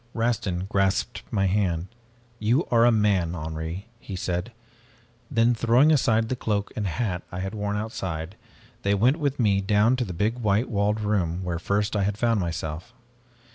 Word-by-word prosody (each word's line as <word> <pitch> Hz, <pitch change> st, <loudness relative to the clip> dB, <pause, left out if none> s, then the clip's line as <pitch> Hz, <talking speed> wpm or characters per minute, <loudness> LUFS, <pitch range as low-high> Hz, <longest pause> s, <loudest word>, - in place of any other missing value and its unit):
"Rastin 105 Hz, -6 st, -1 dB
grasped 95 Hz, 0 st, 0 dB
my 100 Hz, -2 st, +1 dB
hand. 90 Hz, -4 st, +1 dB, 0.5 s
'You 120 Hz, +9 st, +2 dB
are 115 Hz, -1 st, +5 dB
a 120 Hz, -, +6 dB
man, 100 Hz, -6 st, +2 dB
Henri,' 80 Hz, +3 st, -5 dB
he 100 Hz, -5 st, -7 dB
said. 90 Hz, +4 st, -3 dB, 0.8 s
Then, 120 Hz, -2 st, +3 dB
throwing 120 Hz, +6 st, +4 dB
aside 115 Hz, -6 st, +3 dB
the 130 Hz, -, -1 dB
cloak 105 Hz, -4 st, -2 dB
and 105 Hz, -2 st, -1 dB
hat 90 Hz, -1 st, -2 dB
I 90 Hz, -, -6 dB
had 95 Hz, +2 st, -4 dB
worn 105 Hz, -1 st, -2 dB
outside, 95 Hz, -5 st, -4 dB, 0.5 s
they 100 Hz, +1 st, +2 dB
went 125 Hz, +9 st, +3 dB
with 145 Hz, -3 st, -1 dB
me 100 Hz, -4 st, +3 dB
down 105 Hz, +5 st, +3 dB
to 125 Hz, -, 0 dB
the 100 Hz, -, -5 dB
big 105 Hz, +7 st, -1 dB
white 110 Hz, +1 st, +1 dB
walled 105 Hz, +1 st, +1 dB
room 95 Hz, -4 st, 0 dB
where 85 Hz, -2 st, -2 dB
first 100 Hz, +3 st, 0 dB
I 100 Hz, -, +2 dB
had 100 Hz, +1 st, 0 dB
found 115 Hz, -1 st, +2 dB
myself. 85 Hz, +4 st, -4 dB
105 Hz, 175 wpm, -25 LUFS, 90-115 Hz, 0.8 s, a